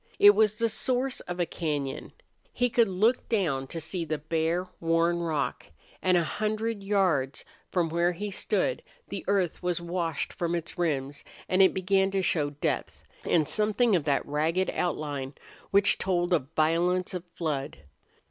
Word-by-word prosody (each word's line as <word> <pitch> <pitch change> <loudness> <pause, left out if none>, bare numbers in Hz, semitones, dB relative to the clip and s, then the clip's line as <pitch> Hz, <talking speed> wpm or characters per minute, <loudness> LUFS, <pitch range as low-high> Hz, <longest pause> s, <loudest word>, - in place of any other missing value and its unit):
It 205 - +9
was 215 0 +3
the 230 +2 +1
source 255 +4 0
of 180 0 -6
a 175 - +2
cañon. 145 -6 -3 0.4
He 245 -1 0
could 235 -1 +4
look 215 +7 +1
down 155 - 0
to 165 - -5
see 170 +2 -3
the 155 -1 -2
bare, 165 +3 -1
worn 165 +1 +2
rock, 160 -4 -2 0.3
and 185 -1 +3
a 170 - +2
hundred 215 +4 -2
yards 185 -10 +1 0.2
from 175 -3 +1
where 170 +2 +2
he 205 +4 -5
stood - - 0 0.3
the - - -5
earth 195 -4 0
was 180 -2 -1
washed 170 -3 -2
from 170 0 -1
its 170 -1 -4
rims 145 -5 -2 0.2
and 185 +1 +3
it 190 - +7
began 190 +1 +2
to 195 -1 -1
show 150 -5 +1
depth 145 0 -3 0.2
and 155 -4 +3
something 215 +5 +2
of 160 -5 0
that 140 -2 +1
ragged 160 +6 0
outline 145 -5 -3 0.3
which 200 0 +5
told 175 -1 0
of 140 -6 +1
violence 175 +4 +1
of 180 -2 -4
flood. 145 - -3
175 Hz, 165 wpm, -28 LUFS, 155-195 Hz, 0.4 s, It